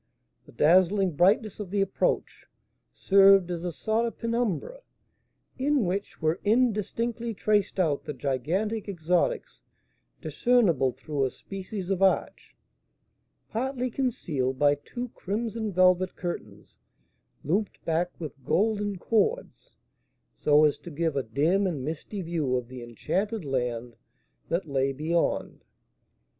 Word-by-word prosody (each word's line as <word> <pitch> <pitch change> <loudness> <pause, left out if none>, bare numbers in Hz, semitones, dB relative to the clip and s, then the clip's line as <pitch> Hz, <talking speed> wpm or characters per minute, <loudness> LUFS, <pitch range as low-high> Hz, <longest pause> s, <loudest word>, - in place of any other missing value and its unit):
The - - -14
dazzling 185 +3 +4
brightness 200 +6 +3
of 205 -3 -5
the 200 +1 0
approach 195 -1 -1 0.5
served 195 -2 +5
as 170 -1 -4
a 175 - -2
sort 220 +6 0
of 230 - -7
penumbra, 235 - -2 0.8
in 275 -3 +2
which 195 +3 -3
were 160 +2 0
indistinctly 230 +1 0
traced 205 -1 +1
out 155 -6 +1
the 150 - -4
gigantic 170 - -2
exotics 180 - -1 0.6
discernible 190 - +2
through 135 +2 -2
a - - 0
species 195 +4 -7
of 190 -1 0
arch, 195 -1 +1 0.9
partly 255 +2 -2
concealed 160 - -1
by 145 +1 +4
two 240 - -6
crimson 220 +2 -3
velvet 185 0 +3
curtains 175 -1 -7 0.6
looped 195 +8 -2
back 170 +2 +1
with 140 -5 -8
golden 205 - 0
cords 235 - -1 0.7
so 150 +1 +4
as 150 - +1
to - - -10
give 160 -1 -1
a 135 - +1
dim 155 - +1
and 145 -8 -3
misty 165 +6 -5
view 160 -6 -1
of 125 -1 -3
the 130 -1 -8
enchanted 190 - -3
land 125 -3 -2 0.5
that 170 +1 -1
lay 135 -1 0
beyond. 160 +5 -1
185 Hz, 125 wpm, -27 LUFS, 150-215 Hz, 0.9 s, served